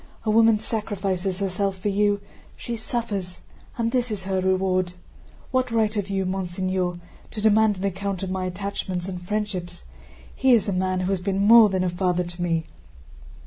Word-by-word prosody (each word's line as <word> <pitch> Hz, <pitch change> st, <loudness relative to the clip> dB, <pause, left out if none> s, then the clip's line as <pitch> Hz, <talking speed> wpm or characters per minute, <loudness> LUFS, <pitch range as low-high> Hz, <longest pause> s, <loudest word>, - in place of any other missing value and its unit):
A 215 Hz, -, +2 dB
woman 225 Hz, 0 st, +5 dB
sacrifices 195 Hz, -4 st, -2 dB
herself 195 Hz, 0 st, -1 dB
for 195 Hz, +3 st, -2 dB
you, 205 Hz, 0 st, +2 dB, 0.3 s
she 235 Hz, -, -5 dB
suffers, 210 Hz, -5 st, -4 dB, 0.4 s
and 230 Hz, -1 st, 0 dB
this 250 Hz, -1 st, 0 dB
is 205 Hz, -3 st, -4 dB
her 190 Hz, -1 st, -1 dB
reward! 185 Hz, -1 st, +1 dB, 0.6 s
What 255 Hz, -1 st, +1 dB
right 220 Hz, -2 st, +1 dB
have 205 Hz, -2 st, -2 dB
you, 195 Hz, -1 st, 0 dB
monseigneur, 185 Hz, -1 st, -1 dB, 0.3 s
to 220 Hz, -, -7 dB
demand 215 Hz, -1 st, +4 dB
an 185 Hz, -, -6 dB
account 195 Hz, 0 st, -2 dB
of 190 Hz, -, -3 dB
my 185 Hz, 0 st, -2 dB
attachments 185 Hz, -1 st, -3 dB
and 180 Hz, -2 st, -5 dB
friendships? 185 Hz, -, -3 dB, 0.5 s
He 265 Hz, -1 st, +4 dB
is 225 Hz, -4 st, +3 dB
a 200 Hz, -, 0 dB
man 185 Hz, 0 st, 0 dB
who 185 Hz, +1 st, -1 dB
has 190 Hz, -2 st, 0 dB
been 195 Hz, +1 st, 0 dB
more 225 Hz, 0 st, +8 dB
than 190 Hz, -1 st, 0 dB
a 185 Hz, -, +1 dB
father 180 Hz, 0 st, 0 dB
to 175 Hz, 0 st, -8 dB
me!" 165 Hz, -2 st, 0 dB
195 Hz, 180 wpm, -24 LUFS, 185-210 Hz, 0.6 s, more